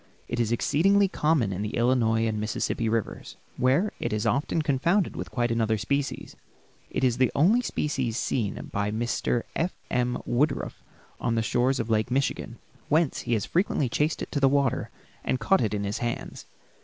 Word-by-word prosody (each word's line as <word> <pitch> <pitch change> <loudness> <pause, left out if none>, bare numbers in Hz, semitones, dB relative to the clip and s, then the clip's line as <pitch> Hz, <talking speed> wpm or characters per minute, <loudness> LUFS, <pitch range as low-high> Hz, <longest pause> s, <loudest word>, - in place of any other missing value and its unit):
It 120 - -3
is 115 -1 +1
exceedingly 195 - +3
common 150 - +1
in 95 - -4
the 105 +2 -3
Illinois 115 -2 +2
and 110 -1 -1
Mississippi 110 +1 -1
rivers, 115 -2 -3 0.2
where 140 +12 +2
it - - -2
is 105 0 -1
often 155 +3 +1
confounded 165 +7 +1
with - - -5
quite 120 -2 0
another 110 -1 +1
species. 140 +6 -2 0.5
It - - -2
is 125 -2 +3
the 130 - +3
only 200 - +4
species 135 - -2
seen 110 -7 -1 0.2
by 100 0 0
Mr. 120 +2 -1
F. 170 +3 -1 0.2
M. 125 0 +1
Woodruff 140 +5 0 0.4
on 115 -1 0
the 115 - +1
shores 125 +4 +1
of 115 0 -2
Lake 110 +2 +1
Michigan, 125 -2 -1 0.3
whence 155 -1 +2
he 120 - -2
has 110 - +1
frequently 165 - +1
chased 150 +6 0
it - - -8
to 145 - 0
the 135 -1 +5
water 140 -2 +1 0.3
and 130 - 0
caught 190 +12 +3
it 110 - 0
in 100 - -2
his 100 +1 -2
hands. 120 -1 -4
125 Hz, 180 wpm, -26 LUFS, 115-145 Hz, 0.5 s, the